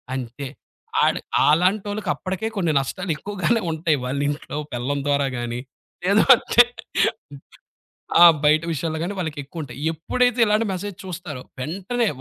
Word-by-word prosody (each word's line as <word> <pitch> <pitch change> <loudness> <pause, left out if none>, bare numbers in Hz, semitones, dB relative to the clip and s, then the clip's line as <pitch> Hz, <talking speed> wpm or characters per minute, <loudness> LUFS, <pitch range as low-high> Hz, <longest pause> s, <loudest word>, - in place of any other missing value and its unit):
అంతే. 130 +2 -5 0.6
అడు, - - +1 0.3
అలాంటోళ్ళకి 200 +6 +1
అప్పటికే 190 +3 -4
కొన్ని 170 -4 +1
నష్టాలెక్కువగానే 185 - -1
ఉంటాయి. 160 -1 +1
వాళ్ళ 130 +3 -2
ఇంట్లో 145 0 -4 0.2
పెళ్ళం 135 +4 -2
ద్వారా 140 -1 +2
గాని 120 0 -3 0.5
లేదు 200 +3 +4
అంటే 240 - +5 1.6
ఆ! - - +12 0.2
బయట 155 +2 +5
విషయాల్లో 160 +1 -2
గాని, 185 +4 -3
వాళ్ళకెక్కువుంటాయి. 145 -4 -6
ఎప్పుడైతే 245 +10 0
ఇలాంటి 215 +2 +2
మెసేజ్ 195 +1 -5
చూస్తారో, 165 -7 -6 0.2
వెంటనే 195 - -2
165 Hz, 120 wpm, -22 LUFS, 145-200 Hz, 1.6 s, ఆ